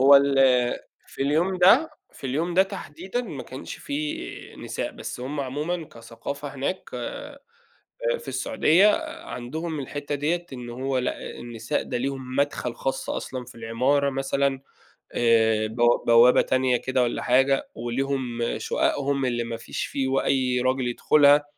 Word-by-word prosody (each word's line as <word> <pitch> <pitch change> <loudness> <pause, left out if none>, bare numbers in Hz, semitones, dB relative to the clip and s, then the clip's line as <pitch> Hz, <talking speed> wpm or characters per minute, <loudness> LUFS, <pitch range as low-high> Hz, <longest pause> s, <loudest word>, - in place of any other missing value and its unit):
هو 140 +1 +9
ال 140 0 +3 0.7
في - - -5
اليوم 160 +7 +1
ده، 235 - +6 0.2
في 135 - -8
اليوم 160 +7 -1
ده 190 - +7
تحديدًا 190 +5 -5
ما 160 - -6
كانش 130 - -8
في 150 +1 -5
نساء، - - -4
بس - - -7
هُم 140 +4 -3
عمومًا 150 +6 -3
كثقافة 115 +5 -7
هناك، 140 +7 -2
آآ 285 - -6 0.8
في 475 - -14
السعودية 200 - +3 0.4
عندهم 155 +6 -5
الحتة 145 +1 -4
ديّة، 165 +5 -1
إن 125 -1 -7
هو 130 +2 -2
لأ، 125 - -2 0.2
النساء 120 +4 -3
ده 125 - -3
ليهم 130 0 -4
مدخل 140 -4 0
خاص 135 +2 -3
أصلًا 130 -2 -4
في 125 - -14
العمارة 125 +5 +1
مثلًا، 135 0 0 0.5
آآ، 110 -2 +3
بو 120 +2 +2
بوابة 120 +1 +7
تانية 130 -1 +2
كده 130 +1 0
والّا 120 - -1
حاجة، 135 +2 +2
وليهم 125 0 -2 0.2
شققهم 140 -1 0
اللي 120 -2 0
ما 115 0 -4
فيش 115 - -4
في 135 -1 -2
و 135 +1 +2
أي 130 -2 +1
راجل 130 0 +1
يدخلها، 145 +3 +5
135 Hz, 145 wpm, -25 LUFS, 125-145 Hz, 0.8 s, هو